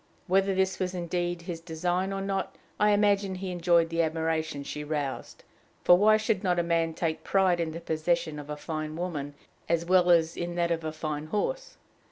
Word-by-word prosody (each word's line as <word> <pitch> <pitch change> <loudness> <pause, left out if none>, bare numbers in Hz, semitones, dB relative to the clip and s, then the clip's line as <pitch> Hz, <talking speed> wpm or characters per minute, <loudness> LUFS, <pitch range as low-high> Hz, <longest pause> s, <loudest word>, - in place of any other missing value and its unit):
Whether 195 +1 +2
this 190 0 +1
was 185 0 -2
indeed 175 0 -2
his 170 -2 -5
design 180 +3 -1
or 195 0 -3
not, 195 -1 -2 0.2
I 210 - +4
imagine 205 -2 +2
he 185 0 -5
enjoyed 170 -1 +3
the 165 0 +1
admiration 160 -2 -1
she 150 +1 -5
roused: 145 -3 -4 0.4
for 175 - +8
why 215 +4 +5
should 215 -2 -1
not 180 -2 +1
a 175 - +2
man 165 -1 0
take 160 -2 -2
pride 190 -3 +2
in 165 -1 0
the 165 - -6
possession 160 -1 -1
of 145 0 -9
a 150 - -4
fine 155 0 -4
woman 150 -5 -4 0.3
as 170 0 +1
well 180 0 +4
as 165 -1 +4
in 175 0 -4
that 170 -1 +1
of 165 -1 -1
a 155 - -2
fine 155 -1 -4
horse? - - -3
170 Hz, 200 wpm, -28 LUFS, 160-185 Hz, 0.4 s, for